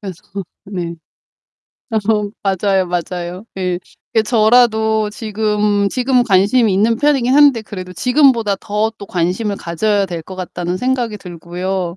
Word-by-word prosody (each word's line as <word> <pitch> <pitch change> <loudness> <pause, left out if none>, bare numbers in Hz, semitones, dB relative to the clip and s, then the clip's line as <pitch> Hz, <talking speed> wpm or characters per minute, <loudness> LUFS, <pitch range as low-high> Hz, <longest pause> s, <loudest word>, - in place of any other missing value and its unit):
그래서 190 -5 -8 0.4
네. 175 -4 -5 1.1
어 210 -2 +1
맞아요, 195 -1 +1
맞아요. 175 +2 -4
예. 180 -1 -1 0.4
이게 220 - +4
저라도 220 -1 +3
지금 210 -2 0
지금 250 0 +1
관심이 205 +2 +3
있는 220 +4 +2
편이긴 270 -3 +2
한데 280 -6 +5
그래도 185 -3 -8
지금보다 245 - +3
더 210 +2 -1
또 200 - -8
관심을 190 +4 -1
가져야 200 +4 0
될 170 -2 -5
것 190 - -10
같다는 180 -1 -4
생각이 250 -4 -1
들고요 180 0 -4
205 Hz, 285 characters per minute, -17 LUFS, 185-225 Hz, 1.1 s, 한데